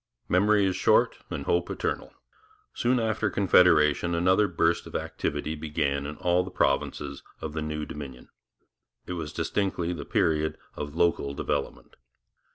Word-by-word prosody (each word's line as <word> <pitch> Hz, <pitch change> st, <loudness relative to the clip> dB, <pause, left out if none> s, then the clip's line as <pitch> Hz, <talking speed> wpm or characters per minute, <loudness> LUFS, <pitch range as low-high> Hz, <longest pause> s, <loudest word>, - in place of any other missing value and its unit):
Memory 100 Hz, +2 st, +3 dB
is 95 Hz, -1 st, 0 dB
short -, -, +3 dB
and -, -, -4 dB
hope 85 Hz, 0 st, +1 dB
eternal. -, -, -3 dB, 0.6 s
Soon 125 Hz, +1 st, +1 dB
after 110 Hz, -2 st, 0 dB
Confederation 85 Hz, -4 st, +4 dB
another 95 Hz, +4 st, +3 dB
burst 85 Hz, -2 st, +1 dB
of -, -, -10 dB
activity 75 Hz, +1 st, -2 dB
began 70 Hz, -2 st, -2 dB
in 75 Hz, -, -6 dB
all 90 Hz, 0 st, +2 dB
the 95 Hz, -, -7 dB
provinces 70 Hz, -3 st, -1 dB, 0.2 s
of 75 Hz, -2 st, -5 dB
the 80 Hz, -, -3 dB
new 75 Hz, 0 st, -3 dB
Dominion. 70 Hz, -5 st, -9 dB, 0.8 s
It -, -, -5 dB
was 80 Hz, -4 st, -5 dB
distinctly 90 Hz, -4 st, -1 dB
the 85 Hz, -, -6 dB
period 80 Hz, -1 st, +1 dB, 0.2 s
of 75 Hz, 0 st, -6 dB
local 80 Hz, -5 st, +1 dB
development. -, -, -3 dB
85 Hz, 145 wpm, -27 LUFS, 75-90 Hz, 0.8 s, Confederation